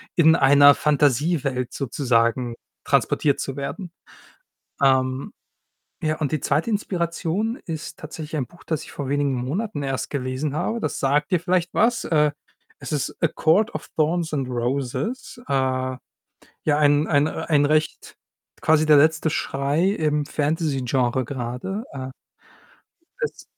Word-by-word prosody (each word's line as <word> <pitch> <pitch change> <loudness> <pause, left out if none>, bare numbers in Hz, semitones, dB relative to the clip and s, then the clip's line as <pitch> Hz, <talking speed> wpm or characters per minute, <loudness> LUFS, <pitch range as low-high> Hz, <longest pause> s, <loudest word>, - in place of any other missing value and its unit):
in 160 -2 +6
einer 145 0 +7
Fantasiewelt 145 -2 +1
sozusagen 120 -3 0 0.3
transportiert 145 -2 +1
zu 135 - -4
werden. 165 +6 -5 0.9
Ähm, 130 -1 +2 0.7
ja, 155 0 0
und 150 -3 -1
die 155 - 0
2. 150 - 0
Inspiration 190 +2 -1
ist 160 -2 -6
tatsächlich 155 0 -6
ein 130 - -1
Buch, 170 - -19
das 160 -3 -2
ich - - -12
vor 140 -2 -5
wenigen 145 -1 +1
Monaten 145 - -3
erst 135 -1 -3
gelesen 135 +1 -3
habe. 200 +8 -1
Das - - -3
sagt 145 +7 +1
dir 180 - +3
vielleicht 180 -1 0
was. 230 +2 +2
Äh, 150 -2 +3 0.5
es - - -5
ist 145 - -2
„A 165 - +4
Court 200 +9 +2
of - - -6
Thorns 160 +1 +1
and 135 -3 -1
Roses.“ 135 - -3
Äh, - - -2
ja, 130 -1 0 0.8
ein 145 0 +4
ein 145 0 +3
äh, - - -2 0.2
ein 145 -3 +3
recht 155 +1 0 0.5
quasi 155 0 +3
der 150 - +7
letzte 155 +2 +3
Schrei 145 +6 0
im 150 -6 0
Fantasy-Genre 135 -5 0
grade. 125 - -4
Äh. 130 -1 -6 1.1
Es 475 - -3
150 Hz, 140 wpm, -23 LUFS, 135-165 Hz, 1.1 s, einer